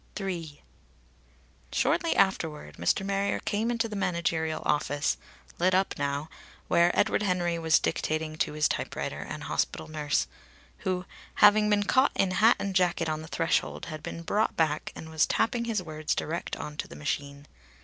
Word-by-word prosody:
III. 170 -7 -5 1.1
Shortly 335 - +1
afterward 155 - 0
Mr. 85 - +1
Marrier 200 0 0
came 220 +2 -1
into 230 -1 0
the 215 - -6
managerial 170 -4 -1
office, 145 0 +1 0.4
lit 185 +2 +3
up 190 +1 +2
now, 140 +1 -1 0.4
where 170 0 +4
Edward 205 - +2
Henry 175 -4 0
was 160 -1 +4
dictating 155 0 -1
to - - 0
his 150 0 +3
typewriter - - -3
and - - -6
hospital - - -1
nurse, 150 -2 0 0.5
who, 180 -1 -2 0.3
having 210 0 +6
been 205 -1 +3
caught 260 +6 +3
in 195 -1 +2
hat 220 +5 +5
and 195 -1 -3
jacket 175 -3 +2
on 155 0 -2
the 160 - -9
threshold, 165 +1 0
had 155 -2 -7
been 165 +2 -6
brought 210 +6 0
back 155 -2 +1
and 160 - -9
was 160 -1 +3
tapping 235 +1 +1
his 220 -5 -1
words 155 -2 -2
direct 165 +3 -3
on 150 0 -7
to - - -3
the - - -11
machine. 140 - -4
170 Hz, 165 wpm, -28 LUFS, 155-195 Hz, 1.1 s, having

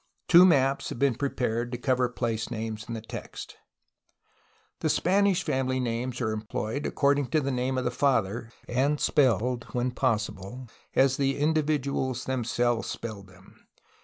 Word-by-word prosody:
Two 180 +1 +8
maps 135 -5 +3
have - - -6
been 140 +1 +3
prepared 120 -2 -2
to 120 - -3
cover 125 0 +1
place 115 -3 -2
names 110 -2 -4
in 115 - -4
the 110 - -5
text. 110 - -8 1.3
Spanish 195 +1 +2
family 130 0 0
names 125 0 -2
are 110 -2 0
employed 110 +5 -3
according 140 -1 +2
to 155 - +2
the 140 -2 -1
name 130 +1 -1
of 130 - 0
the 120 - 0
father, 120 -4 0 0.2
and 140 +4 +1
spelled, 125 -3 +2
when 125 +1 0
possible, 115 -1 -2 0.3
as 135 0 +4
the 135 -1 +1
individuals 145 -4 0
themselves 120 -2 0
spelled 105 -4 -6
them. 95 +1 -20
125 Hz, 145 wpm, -27 LUFS, 115-140 Hz, 1.3 s, Two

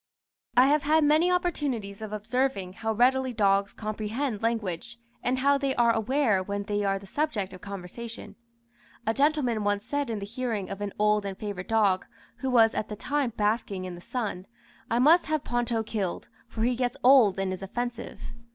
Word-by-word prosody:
I 250 - +8
have 295 +2 +3
had 310 +2 +3
many 310 +4 +4
opportunities 285 - -1
of 215 -1 -6
observing 215 -3 -1
how 220 +2 -2
readily 255 +3 +2
dogs 200 -2 +2
comprehend 215 +2 -3
language, 225 -1 -2 0.2
and 250 +2 0
how 280 +2 +3
they 275 -1 0
are 235 -1 +4
aware 225 -2 +2
when 200 +2 -3
they 205 0 -1
are 195 -1 +1
the 195 - -11
subject 210 -6 -2
of 185 - -11
conversation. 200 +4 -8 0.7
A 225 - +1
gentleman 275 -5 +1
once 205 0 0
said 285 0 -2
in 225 - -2
the 200 - -5
hearing 225 -3 -3
of 195 +1 -6
an 205 -1 -2
old 210 0 +3
and 195 -1 -5
favourite 200 -4 -6
dog, 205 -4 +2 0.3
who 265 - -2
was 225 -3 +5
at 215 - -3
the 210 - -4
time 275 +2 -1
basking 205 -3 0
in 180 - -6
the 175 - -10
sun, 200 -5 -4 0.4
"I 230 - +1
must 310 +8 +5
have 310 -2 0
Ponto 240 -2 0
killed, 205 -5 -3 0.2
for 220 - -3
he 245 +1 +2
gets 245 0 -1
old 245 -7 +6
and 195 -1 -1
is 185 - -7
offensive." 240 +4 -5
225 Hz, 190 wpm, -27 LUFS, 200-260 Hz, 0.7 s, I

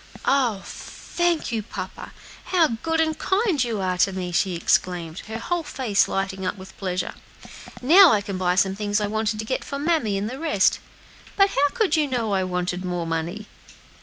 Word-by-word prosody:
"Oh, 245 -8 +2
thank 345 -5 -2
you, 225 -2 -1
papa! 210 - -7 0.3
how 345 -4 +3
good 325 0 0
and 315 -1 +2
kind 380 - +1
you 225 -4 -2
are 185 -1 -1
to 195 - +4
me!" 185 -2 -4
she 180 +1 +1
exclaimed, 170 -1 0
her 220 +1 -5
whole 345 +9 -2
face 255 -9 +1
lighting 195 0 -2
up 185 +2 -2
with 190 0 -12
pleasure; 185 -2 -2 0.7
"now 345 +6 +8
I 210 - +3
can 195 -2 -5
buy 180 -1 +1
some 190 +1 +2
things 205 0 0
I 210 - 0
wanted 215 +1 -1
to 220 - -4
get 260 +4 -2
for 280 - -5
mammy 285 -9 +1
and 200 +2 -2
the 260 +4 -6
rest. 300 -13 +2 0.6
But 395 0 +5
how 285 +1 +2
could 435 -7 +2
you 305 -2 +2
know 235 -6 -1
I 190 -1 +1
wanted 180 0 -2
more 175 -2 -2
money?" 165 +6 -3
210 Hz, 190 wpm, -23 LUFS, 185-290 Hz, 0.7 s, now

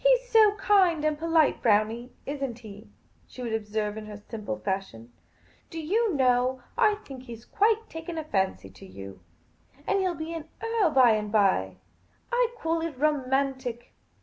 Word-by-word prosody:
" - - -25
He - - +6
's - - -18
so 430 -2 +6
kind 375 -6 +3
and 305 -1 +2
polite, 325 -1 +2
Brownie, 225 +3 +1
is 285 0 -5
n't 240 -4 -3
he? 215 -2 -12 0.2
" - - -36
she 255 - -9
would 230 -2 -3
observe 210 -1 -2
in 215 -1 -7
her 210 -1 -8
simple 210 - -6
fashion. 120 - -5 0.3
" - - -33
Do 330 - -6
you 400 +5 +1
know, 255 -1 +2
I 435 -3 +4
think 260 -2 -10
he 235 -2 -7
's 225 - -17 0.4
taken 325 +1 -7
quite 315 -1 -4
a - - -21
fancy 190 - -1
to 95 - -14
you! 95 0 -10 0.7
And 395 - +1
he 380 - 0
'11 355 -2 -1
be 320 +1 -5
an 320 -1 -7
earl 455 -5 +1
by 260 -5 +6
and 210 -1 -1
by. 190 - +2 0.6
I 485 -1 +3
call 330 -4 -1
it 325 -5 -4
romantic. 265 -4 -1
260 Hz, 195 wpm, -27 LUFS, 215-330 Hz, 0.7 s, He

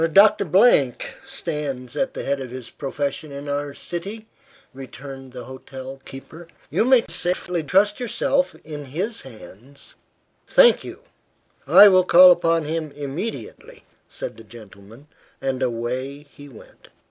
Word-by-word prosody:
"Doctor 200 -2 +5 0.8
stands 150 - -5
at 265 -1 -2
the - - -4
head 140 0 -1
of 130 - -6
his 125 -1 -9
profession 145 +2 -4
in 140 +1 -8
our 145 0 -3
city," 200 +6 -6 0.5
returned 135 0 -10
the 125 0 -9
hotel 130 0 -10
keeper. 160 +5 -11 0.2
"You - - +2
may 255 -2 +4
safely 175 0 -1
trust 195 - +2
yourself 270 +3 0
in 150 -2 -8
his 190 - -4
hands." 130 +2 -14 0.5
"Thank - - +5
you. - - -10 0.6
I 210 - +9
will 185 -2 +5
call 180 +1 +8
upon 165 -2 +2
him 155 0 -4
immediately," 145 - -7 0.3
said - - -7
the 115 - -12
gentleman, 110 +2 -15 0.3
and 135 -1 -3
away 130 +4 -3
he 145 0 -13
went. 120 - -17
145 Hz, 135 wpm, -22 LUFS, 130-180 Hz, 0.8 s, I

